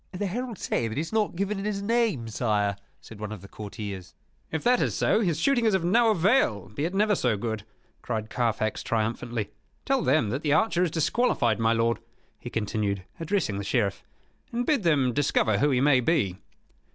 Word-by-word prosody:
"The 185 +3 -2
heralds 230 +2 -4
say 115 - 0
that 110 - -5
he - - -1
has 165 +6 -6
not 215 -4 +1
given 200 +2 -1
in 195 - -4
his 200 -1 -2
name, 220 - +1
sire," 105 -3 0 0.3
said 110 - -12
one 105 0 -5
of 105 -3 -8
the - - -10
courtiers. 100 -3 -7 0.4
"If 160 - -2
that 245 0 +3
is - - 0
so, - - +3
his 170 -8 0
shooting 270 +3 +2
is 215 -3 +4
of 180 -3 0
no 230 +6 +4
avail, 175 - +2
be 125 +9 -3
it 180 +3 -3
never 210 +1 +3
so 125 - +1
good," 110 0 -3 0.4
cried 110 -2 -3
Carfax, 115 -3 0
triumphantly. 115 0 -2 0.3
"Tell 270 -1 +2
them 120 - +2
that 130 +5 -2
the 150 -2 +1
archer 215 -1 +2
is 180 - +2
disqualified, 155 - +1
my 115 0 +3
lord," 115 0 +1 0.4
he 120 - -7
continued, 105 -3 -2 0.2
addressing 165 - -1
the - - -3
Sheriff; 100 -2 0 0.5
"and 240 +1 -1
bid 290 -4 +2
them 145 -8 +2
discover 115 -6 +2
who 145 - +3
he 130 -2 +2
may 140 -2 +5
be." 120 - +1
135 Hz, 200 wpm, -26 LUFS, -, 0.5 s, may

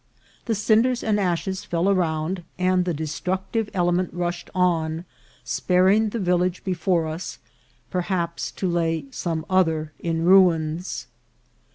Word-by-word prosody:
The 225 - 0
cinders 225 +4 +2
and 210 -2 +1
ashes 190 +1 -1
fell 170 +2 0
around, 175 -2 0 0.2
and 185 0 +2
the 180 - 0
destructive 185 +8 -2
element 175 0 +1
rushed 175 0 -3
on, 165 -2 +1 0.4
sparing 190 +4 +3
the 235 - -4
village 180 -2 0
before 180 -2 0
us, 160 +3 -5 0.5
per 180 - 0
haps 175 -2 -2
to 190 - -2
lay 165 -3 0
some 165 0 -3
other 160 -5 +1
in 165 -1 -1
ruins. 165 -7 +3
180 Hz, 130 wpm, -24 LUFS, 165-190 Hz, 0.5 s, sparing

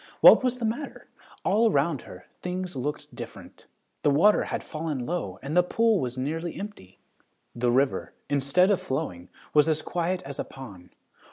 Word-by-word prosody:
What - - +9
was 250 -1 +1
the 240 - -2
matter? 240 +6 -4 0.4
All 220 +4 +4
around 145 - +1
her - - -11 0.2
things 180 -1 -4
looked 145 +3 -4
different. - - -10 0.3
The - - +3
water 170 +9 +4
had - - -3
fallen 155 -5 -4
low 120 - -3
and 145 +4 -3
the 180 - +7
pool 225 +3 +2
was 125 -2 -3
nearly 160 +6 -3
empty. 200 - -9 0.6
The 120 0 0
river, 130 +2 +1
instead 145 +7 +3
of 195 - +2
flowing, 90 -9 -4 0.2
was 150 +1 +5
as 155 0 +1
quiet 180 +1 -1
as 135 0 -7
a - - 0
pond. 100 -10 -12
155 Hz, 170 wpm, -27 LUFS, 135-185 Hz, 0.6 s, What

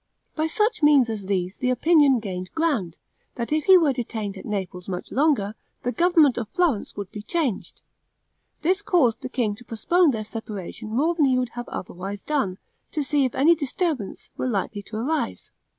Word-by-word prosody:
By 315 0 0
such 430 +6 0
means 285 -6 +5
as 205 -3 -5
these 190 -1 -1
the 250 - 0
opinion 285 0 +4
gained 185 -4 -5
ground, 275 - 0 0.4
that 235 +4 -2
if 310 -1 0
he 380 -1 +8
were 310 -6 +3
detained 220 -5 -4
at 190 - -9
Naples 185 -4 -4
much 180 -1 -5
longer, 265 -8 +2 0.3
the 245 - 0
government 330 -5 +4
of 220 -3 -5
Florence 320 - 0
would 200 -2 -6
be 210 - -7
changed. 270 - -2 0.8
This 370 +5 +2
caused 320 - +2
the 255 - -5
king 240 -5 0
to 245 - -13
postpone 330 +10 +2
their 220 -5 -1
separation 215 -1 -6
more 285 +10 +1
than 320 -4 +3
he 260 -2 +3
would 250 -1 0
have 240 +1 -7
otherwise 195 +3 -6
done, 205 -12 -1 0.4
to 300 - 0
see 285 -1 +2
if 255 - -3
any 300 +6 +5
disturbance 295 - -3
were 255 - -2
likely 205 -1 -2
to 215 - -10
arise. 230 - -2
245 Hz, 185 wpm, -24 LUFS, 205-310 Hz, 0.8 s, he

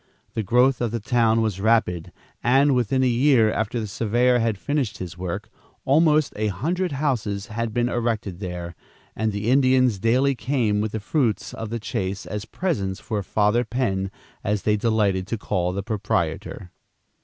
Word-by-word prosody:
The 110 - -1
growth 125 +6 +3
of 120 - +1
the 115 +2 -3
town 115 0 +2
was 100 -4 -2
rapid, 105 -6 +1 0.3
and, 135 +3 +4
within 125 +1 +1
a - - +3
year 120 -2 +4
after 110 +2 -1
the 110 - -3
surveyor 120 +4 +2
had 115 -3 0
finished 130 -3 -2
this 90 -2 -6
work, 95 +5 -5 0.3
almost 155 +1 +3
a 110 +1 0
hundred 160 - -1
houses 115 -9 -1
had 115 0 -2
been 120 +2 +1
erected 115 -6 -2
there, 90 -3 -5 0.4
and 110 0 0
the 105 +3 -1
Indians 130 -5 +4
daily 130 +6 +3
came 115 -4 0
with 110 0 -3
the 110 - -2
fruits 115 0 -1
of 115 - -5
the 115 +1 -3
chase 95 -2 -3
as 105 0 -5
presents 100 - -2
for 105 -3 -3
"Father 105 +4 +2
Penn," 110 -5 -1 0.3
as 105 0 -1
they 105 - +3
delighted 100 -4 +1
to 115 - -2
call 90 -3 -1
the 100 +1 -3
proprietor. 90 -4 -2
110 Hz, 170 wpm, -23 LUFS, 100-125 Hz, 0.4 s, and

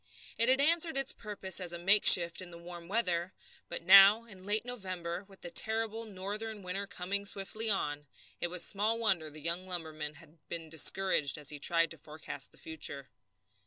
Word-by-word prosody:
It 230 +2 +1
had 260 +1 +3
answered 325 +1 +3
its 270 -1 +1
purpose 200 -3 -2
as 180 -2 -3
a 170 - -5
makeshift 175 -2 +6
in 185 - -9
the 170 - -11
warm 170 0 -10
weather, 180 -4 -1 0.4
but 170 - -6
now, 195 +5 +8
in 195 -5 -14
late 210 +3 -1
November, 185 -8 -5
and 195 - -18
with 195 -2 -16
the 175 - -7
terrible 225 +2 0
northern 210 +1 -6
winter 195 +2 -5
coming 195 +2 -4
swiftly 200 +3 -1
on, 145 -7 -2 0.3
it - - -2
was 175 0 -1
small 215 +3 0
wonder 190 -9 0
the 150 +1 -11
young 170 +3 -2
lumberman 155 -4 -6
had 165 0 -17
been 165 -2 -7
discouraged 160 -2 +3
as 150 -2 -1
he 150 - -5
tried 165 +2 +1
to - - -9
forecast 155 0 -7
the - - -19
future. 145 -3 -5
185 Hz, 190 wpm, -31 LUFS, 170-210 Hz, 0.4 s, now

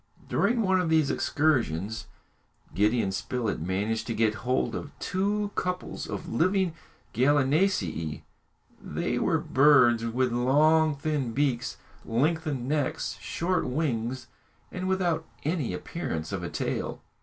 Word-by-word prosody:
During 230 +3 +2
one 190 -1 +3
of 170 - -1
these 155 -3 +3
excursions, 110 - 0 0.7
Gideon 105 +3 +2
Spilett 115 +3 -2
managed 100 +6 -1
to 115 - -2
get 110 -1 +2
hold 125 +5 -1
of 145 - -6
two 205 +2 -1
couples 180 0 -3
of - - -5
living 185 - +1 0.4
gallinaceæ. 130 - +1 0.6
They - - -2
were - - +2
birds 130 -5 +5
with 125 +2 0
long, 150 +6 +4
thin 140 -4 -2
beaks, 135 -3 0 0.3
lengthened 145 +1 0
necks, 145 -1 -1
short 180 +2 -1
wings, 125 -3 -1 0.5
and 185 0 -4
without 175 -4 +1 0.2
any 155 - -1
appearance 80 - -4
of - - -3
a - - -4
tail. - - -3
140 Hz, 120 wpm, -27 LUFS, 115-160 Hz, 0.7 s, birds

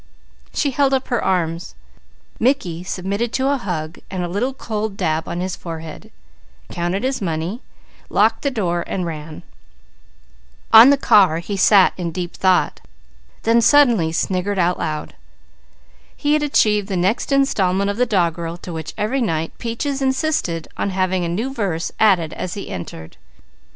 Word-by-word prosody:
She 285 - 0
held 275 0 +2
up 265 - -3
her 240 - 0
arms. 170 - -1 0.6
Mickey 215 -10 0
submitted 200 +5 -3
to 265 +1 +1
a 285 - +1
hug 170 -8 -5
and 185 -2 -3
a - - -2
little 205 +9 -1
cold 215 -5 -4
dab 160 0 -1
on 175 - -3
his 185 0 -3
forehead, 160 -2 -8 0.6
counted 175 +4 -2
his 265 -2 -1
money, 170 - -3 0.5
locked 220 +2 +2
the 280 - 0
door 175 -9 -1
and 185 -2 -2
ran. 155 -1 -7 1.3
On 225 +4 +10
the 285 - +5
car 190 -10 +4
he 185 +4 -4
sat 195 0 +5
in 175 -2 -3
deep 175 0 -5
thought, 185 -1 +1 0.6
then 230 +1 +4
suddenly 235 - +4
sniggered 185 +4 -1
aloud. 170 -4 -1 1.0
He 295 0 +1
had 305 - +2
achieved 210 -8 +2
the 190 - -2
next 190 +10 0
installment 200 -8 +2
of 200 - -6
the 250 +1 +2
doggerel 170 -4 0
to 175 - -6
which 160 -1 -6
every 240 +6 -1
night 165 -7 -2
Peaches 270 +4 -3
insisted 265 - -1
on - - -1
having 185 -1 0
a 170 - -2
new 225 +10 -2
verse 190 -9 -2
added 180 -7 +3
as 180 - -5
he 200 - -7
entered. 85 -3 -8
190 Hz, 155 wpm, -20 LUFS, 170-235 Hz, 1.3 s, On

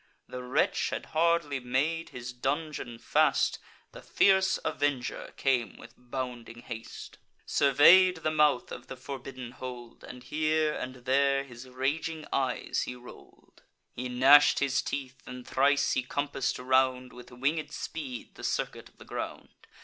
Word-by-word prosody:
The 125 - -7
wretch 125 0 0
had - - -4
hardly 165 -3 +2
made 140 +7 -1
his 125 0 -7
dungeon 135 -1 -3
fast; - - +2 0.3
The - - -11
fierce 190 -1 +3
avenger 140 -4 -2
came 130 -4 0
with 120 - -13
bounding 120 -2 -6
haste; 115 -2 -9 0.3
Survey'd 165 +5 +5
the 155 - +1
mouth 150 -4 +2
of 125 - -8
the 130 - -8
forbidden 130 -2 -8
hold, 125 -2 -9
And 125 0 -10
here 155 +3 +1
and 130 -1 -7
there 135 +1 +3
his 125 -1 -12
raging 150 +5 -2
eyes 130 -2 -1
he 125 - -5
roll'd. 125 0 -16 0.3
He 125 +1 -5
gnash'd 135 +4 +6
his 140 -1 +1
teeth; 130 -2 -5
and 125 -1 -9
thrice 145 +1 +2
he - - +1
compass'd 135 +1 -2
round 130 0 +1
With 125 0 -12
winged 140 +6 -1
speed 130 -6 -6
the - - -13
circuit - - -3
of - - -32
the - - -14
ground. - - -6
130 Hz, 145 wpm, -29 LUFS, 125-145 Hz, 0.3 s, gnash'd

